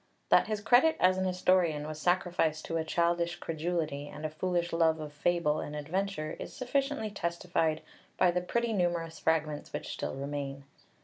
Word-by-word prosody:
That - - +5
his 215 -1 -2
credit 250 +9 +5
as 185 +1 +4
an 190 - 0
historian 180 -4 +2
was 155 0 -6
sacrificed 175 -3 +1
to 165 - -2
a 160 - 0
childish 170 +1 +1
credulity 160 -3 -2
and 150 +1 -7
a 155 - -2
foolish 175 +1 -1
love 165 -1 +3
of 150 -1 -7
fable 155 0 +1
and 150 - -5
adventure 160 +1 -2
is - - -6
sufficiently 265 -4 -1
testified 170 -4 -1 0.3
by 180 - +5
the 180 +1 0
pretty 235 +5 -1
numerous 175 -4 -1
fragments 155 -2 0
which - - -5
still - - -4
remain 140 0 -4
(Pauly). 140 - -32
170 Hz, 175 wpm, -31 LUFS, 155-185 Hz, 0.3 s, That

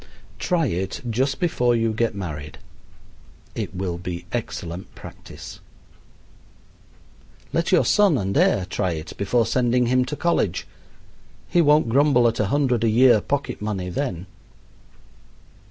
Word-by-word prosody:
Try 170 -3 +1
it 95 - -3
just 130 +4 0
before 125 -9 +1
you 115 -1 +1
get 115 -1 0
married. 75 -6 -6 1.0
It - - -5
will 90 -2 -3
be 90 -1 -6
excellent 95 -6 -5
practice. - - -11 1.9
Let 170 +1 0
your 180 - +4
son 205 -8 +4
and 95 -3 -2
heir 95 - +3
try 95 -2 -1
it 80 0 -7
before 115 +4 +1
sending 125 +1 +1
him 130 +1 +2
to 145 +4 -4
college. 170 - 0 0.8
He 175 - +3
won't 150 -3 +4
grumble 135 -1 +4
at 115 - -1
a 105 - +1
hundred 130 -3 +1
a 115 - +3
year 120 -1 +5
pocket 140 -1 -3
money 100 -4 -3
then. 95 -6 -3
115 Hz, 135 wpm, -23 LUFS, 95-135 Hz, 1.9 s, year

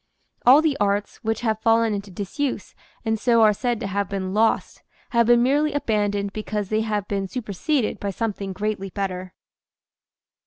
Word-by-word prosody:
All 280 +5 +8
the 310 -3 +2
arts 205 0 0
which 225 -1 -2
have 220 -2 -1
fallen 225 -1 +3
into 200 0 -4
disuse 205 - -4 0.3
and 220 0 0
so 230 0 +4
are 215 -1 +6
said 240 +2 -1
to - - -3
have 200 -1 -2
been 190 -1 -3
lost, 220 +2 +1 0.3
have 235 -1 +3
been 240 0 +5
merely 290 +4 +2
abandoned 205 -6 0
because 210 -2 -3
they 215 0 +1
have 210 -2 -2
been 195 -1 -2
superseded 240 - -2
by 200 - -3
something 200 -1 -3
greatly 200 0 -3
better. 185 -1 -4
215 Hz, 165 wpm, -23 LUFS, 200-235 Hz, 0.3 s, All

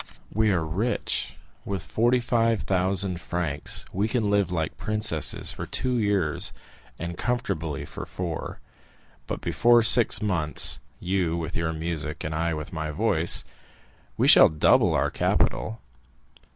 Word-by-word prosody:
"We 110 +1 +1
are 85 -4 -1
rich. 100 +10 -2 0.3
With 100 -3 -4
forty 120 +3 +1
five 115 -3 0
thousand 95 -1 -1
francs 85 -4 -3
we 100 +4 0
can 110 -3 -1
live 100 -3 +1
like 80 -3 -3
princesses 105 -7 +4
for - - -7
two 125 -2 -1
years, 100 -8 -1 0.4
and 85 +1 -7
comfortably 95 - -3
for - - -9
four; 85 -3 -6 0.7
but - - -5
before 120 -1 +3
six 115 +1 +5
months—you 90 0 +1
with 85 0 -5
your 80 0 -1
music, 80 -2 -5
and 80 - -4
I 80 +1 -1
with 75 +2 -8
my 80 -2 -4
voice—we 75 - -2
shall - - +8
double 75 -1 +2
our - - 0
capital. 110 +1 -1
90 Hz, 130 wpm, -25 LUFS, 80-110 Hz, 0.7 s, shall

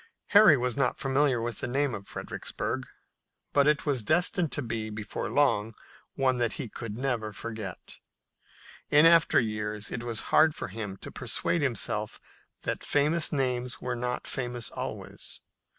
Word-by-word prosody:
Harry 200 -8 +8
was 125 -1 -1
not 140 -3 +1
familiar 135 -2 +2
with 115 -1 -4
the - - -2
name 135 +1 0
of 100 -2 -6
Fredericksburg, - - -4 0.7
but 140 0 +4
it 150 0 +2
was 140 -5 +1
destined 170 - +2
to 145 - -2
be 115 -2 -3
before 105 0 -5
long 115 -7 +2 0.4
one 130 -2 +1
that 120 -2 +1
he - - -4
could 110 -1 -7
never 120 -5 -1
forget. 105 -2 -7 0.9
In 150 +2 +6
after 165 -2 +6
years 105 -1 -3
it 115 - -3
was 115 -2 -1
hard 155 0 +6
for - - -5
him 100 -1 -5
to - - -8
persuade 170 - -1
himself 110 -5 -1 0.4
that - - -3
famous 150 +3 +2
names 125 -3 -1
were 125 -1 -3
not 125 +1 -3
famous 120 -2 -3
always. - - -6
125 Hz, 155 wpm, -28 LUFS, 110-145 Hz, 0.9 s, Harry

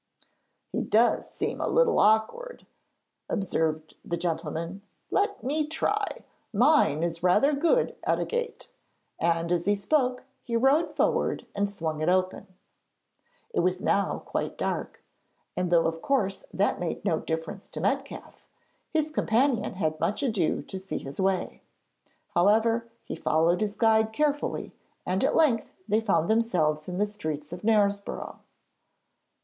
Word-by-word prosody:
'He - - -1
does 230 +3 +2
seem - - -3
a - - 0
little - - +3
awkward,' 220 - +1 0.6
observed 160 -7 -1
the 170 - -3
gentleman. 165 +2 -3 0.3
'Let 405 0 0
me 300 +3 0
try: 415 +7 -1 0.3
mine 235 - +4
is 165 -1 -2
rather 185 - +4
good 340 - +2
at - - +2
a - - -1
gate,' 480 0 -4 0.5
and 170 0 +1
as 175 +1 0
he 205 - +4
spoke 250 +4 0 0.2
he 235 - -4
rode 270 +7 +3
forward - - +1
and 200 0 0
swung 160 -6 -4
it 155 - +2
open. 185 +2 0 1.1
It - - +1
was - - +1
now - - 0
quite - - -3
dark, - - -3 0.5
and 180 -1 -1
though 170 -1 +4
of 165 0 -2
course 210 -9 0
that 200 +2 +1
made 175 +3 -4
no 165 -5 +2
difference 160 0 -4
to - - -7
Metcalfe, - - -3 0.4
his 310 -1 0
companion 245 -5 +1
had 155 -4 -1
much 210 - -1
ado 210 - 0
to 190 - -7
see 190 +1 -5
his 140 +7 -6
way. 190 -1 -1 0.7
However, 225 +5 +3
he - - -6
followed 165 +4 +2
his 210 -1 -1
guide 220 -1 +3
carefully 295 +2 -1 0.3
and 185 +1 0
at - - +2
length 265 -9 +3 0.2
they 215 +2 +2
found 170 -7 +1
themselves 180 -9 +1
in 180 - -4
the 205 - +2
streets 155 -7 -5
of 180 - -7
Knaresborough. 205 -2 0
200 Hz, 145 wpm, -27 LUFS, 170-245 Hz, 1.1 s, mine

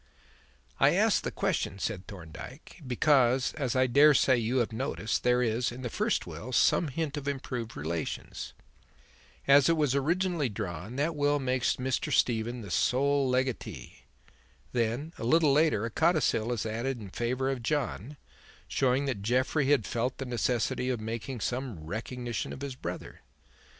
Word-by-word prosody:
"I - - +5
ask - - +3
the - - -3
question," 95 - -1
said 100 -1 -4
Thorndyke, 95 - -10
"because, 130 0 +3
as 135 -6 -2
I 130 0 +4
dare 145 +4 +6
say 130 - +4
you 120 +2 0
have 120 -3 0
noticed, 110 -2 -2
there 125 0 +3
is, 115 +1 0
in 125 +2 -8
the 120 - -3
first - - 0
will, 125 - -7
some 155 +6 +3
hint 150 +1 -3
of 145 -1 -5
improved 125 -4 -4
relations. 80 +2 -4 0.9
As 140 +1 +6
it 165 - +3
was 145 -4 +2
originally 165 +1 +1
drawn 100 +1 -5
that 150 +4 0
will 145 0 +2
makes 130 -2 0
Mr. 130 0 -2
Stephen 120 +1 +1
the 100 -4 -8
sole 140 +4 +2
legatee. 125 - -3 0.7
Then, 120 +7 -1
a - - -5
little 150 +3 +4
later, 150 -8 +3
a 115 - -4
codicil 150 -7 +2
is 115 -2 -2
added 120 +4 -2
in 100 -4 -9
favour 125 +4 -1
of 130 -3 -4
John, 140 0 -2 0.5
showing 135 +1 +1
that 125 -8 -2
Jeffrey 130 +6 +1
had 140 -8 +3
felt 125 +4 -2
the 135 - -4
necessity 125 0 0
of 125 -3 -1
making 115 +2 -5
some 125 -6 -3
recognition 115 +8 -4
of 130 - -8
his 140 -1 -4
brother. 125 - -7
125 Hz, 160 wpm, -29 LUFS, 115-140 Hz, 0.9 s, dare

